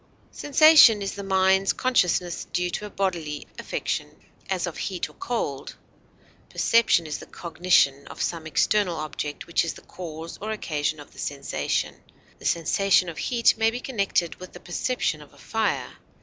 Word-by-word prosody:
Sensation 290 -6 +7
is 195 - -3
the 200 - -6
mind's 190 0 +3
consciousness 180 -8 +1
due 180 0 -1
to 210 - -4
a - - -11
bodily 170 -7 -3
affection, - - -3 0.3
as 190 -2 0
of 175 - -5
heat 185 -3 -3
or - - -17
cold; 145 - -4 0.7
perception 230 -7 +3
is 150 -2 -4
the - - -11
cognition 170 -5 +1
of - - -11
some 165 -2 -2
external 185 +2 +2
object 150 -1 -5
which 170 - +1
is 165 - -4
the - - -14
cause 165 -2 -8
or 215 - -4
occasion 155 -8 -2
of 145 - -12
the - - -14
sensation; 140 -1 -2 0.4
the - - -13
sensation 180 +2 +2
of 165 - -7
heat 235 -2 +3
may 225 0 +4
be 240 +2 -4
connected 200 -9 -1
with 185 0 -10
the 180 - -10
perception 175 -4 -2
of 150 - -16
a - - -20
fire. 225 -1 -2
180 Hz, 165 wpm, -25 LUFS, 160-210 Hz, 0.7 s, Sensation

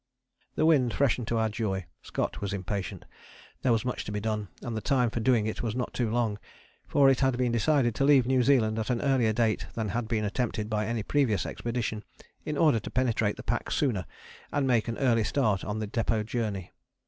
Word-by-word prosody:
The 155 - +2
wind 135 -7 +3
freshened 125 -4 +1
to 115 - 0
our 110 0 +2
joy; 105 -4 -2 0.2
Scott - - -3
was 100 -1 -2
impatient; 100 0 -4 0.6
there 125 - +2
was 115 +1 +1
much 125 - -2
to - - -5
be 105 - -2
done 105 -1 -2 0.2
and 120 -2 -4
the 110 - -2
time 125 -3 +2
for 115 - -2
doing 115 -2 +3
it 110 - -3
was 115 -2 -2
not 125 -1 -3
too 120 -3 0
long, 110 -3 0 0.5
for 140 -1 +4
it 130 - +1
had 130 -2 +2
been 125 -1 +1
decided 120 +1 +2
to 135 - -1
leave 135 -3 +5
New 130 0 +3
Zealand 115 -4 +3
at 110 - -3
an 120 -2 +1
earlier 130 -5 +2
date 110 0 0
than 110 -2 -2
had 120 +1 -2
been 110 -2 0
attempted 105 0 -2
by 105 0 0
any 115 -2 -2
previous 115 -8 +1
expedition, 115 -3 -3 0.4
in 150 -1 -2
order 150 -8 +4
to 105 - -7
penetrate 115 -5 0
the - - -8
pack - - -2
sooner 115 - 0 0.4
and 145 -1 +1
make 120 -4 +2
an 115 - -3
early 120 -4 +3
start 105 -5 +1
on 105 +1 -3
the 110 -1 -3
depôt 110 0 -1
journey. 105 -6 -3
115 Hz, 220 wpm, -28 LUFS, 110-125 Hz, 0.6 s, leave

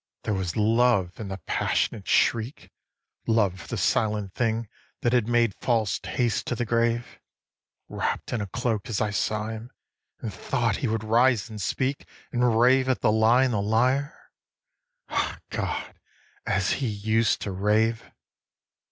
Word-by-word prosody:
_ - - -51
there 105 - -1
was 95 -4 -2
love 110 -4 +2
in 110 - -5
the 95 0 -5
passionate 100 -4 -1
shriek, 115 +4 +1 0.6
Love 100 -5 +2
for 85 - -12
the - - -4
silent 105 -3 0
thing 115 -1 -1 0.3
that 120 - +1
had 120 -3 +2
made 120 -3 +2
false 115 -5 +1
haste 120 -2 -1
to 125 - -1
the 120 - -2
grave 115 +1 0 0.7
Wrapt - - -3
in 120 - -1
a 100 - -3
cloak, 115 +1 -2
as 110 - -1
I 105 -1 0
saw 105 +1 -1
him, 110 +2 -7 0.5
and - - -5
thought - - -1
he - - -1
would 110 -1 -1
rise 115 0 +2
and 105 -1 -6
speak 130 +8 -2 0.2
And 120 -2 +2
rave 130 +2 +4
at 130 - +1
the - - +3
lie 110 +4 +4
and 130 -2 +1
the 105 - +1
liar, 125 +8 0 0.8
ah - - -1
God, - - -3 0.5
as - - +1
he 135 - -1
used 110 +2 +1
to 100 - -3
rave. 110 +4 +1
115 Hz, 160 wpm, -26 LUFS, 105-120 Hz, 0.8 s, rave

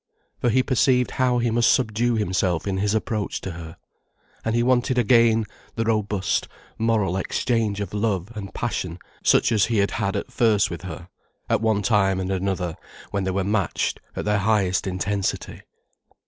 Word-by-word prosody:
For 120 - +1
he 130 +3 +3
perceived 125 -1 +2
how 125 -2 +1
he 120 -1 +1
must 120 +1 +4
subdue 120 0 +1
himself 95 -5 0
in 95 -2 -1
his 105 +2 +1
approach 110 -1 -2
to 95 - -5
her. 80 -1 -9 0.7
And 110 0 0
he 120 - +2
wanted 125 0 +2
again 115 -1 +4 0.3
the 115 - 0
robust, 105 -5 0 0.3
moral 110 -5 +1
exchange 110 +1 0
of 100 -2 -4
love 105 -2 -1
and 100 -2 -6
passion 90 -7 -3 0.3
such - - +4
as 110 -3 +4
he 115 - -1
had 100 0 +2
had 100 -3 -1
at - - -4
first 110 -5 +2
with 85 -1 -5
her, 90 0 -8 0.4
at - - +2
one 110 -2 +1
time 95 -2 +2
and 95 0 -2
another, 95 -3 -2 0.3
when 100 -2 -1
they - - 0
were 95 +1 0
matched 100 -3 0 0.2
at - - -4
their 105 -1 +2
highest 100 -2 +1
intensity. 95 +1 -2
105 Hz, 175 wpm, -23 LUFS, 95-115 Hz, 0.7 s, must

